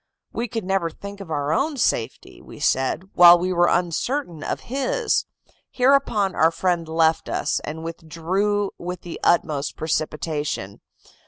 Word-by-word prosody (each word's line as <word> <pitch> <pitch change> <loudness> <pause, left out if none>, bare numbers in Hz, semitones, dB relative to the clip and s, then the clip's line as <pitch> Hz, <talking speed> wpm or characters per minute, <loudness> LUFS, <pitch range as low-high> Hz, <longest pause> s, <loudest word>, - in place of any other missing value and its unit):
We 235 - -2
could 225 -1 -4
never 190 -2 0
think 200 +4 -10
of 190 - -9
our 145 -1 -1
own 300 - 0
safety, 120 - -2
we - - -13
said, 135 +6 +1
while 175 0 +9
we 180 +1 -1
were 175 0 +3
uncertain 175 - -1
of - - -3
his. 445 - -1 0.4
Hereupon 250 -7 +2
our 160 - +4
friend 170 0 -1
left 160 0 +1
us, - - -1
and 160 +1 -6
withdrew 180 +5 -2
with 180 0 -5
the 175 - -8
utmost 150 -4 +1
precipitation. 155 - -3
175 Hz, 145 wpm, -23 LUFS, 160-200 Hz, 0.4 s, while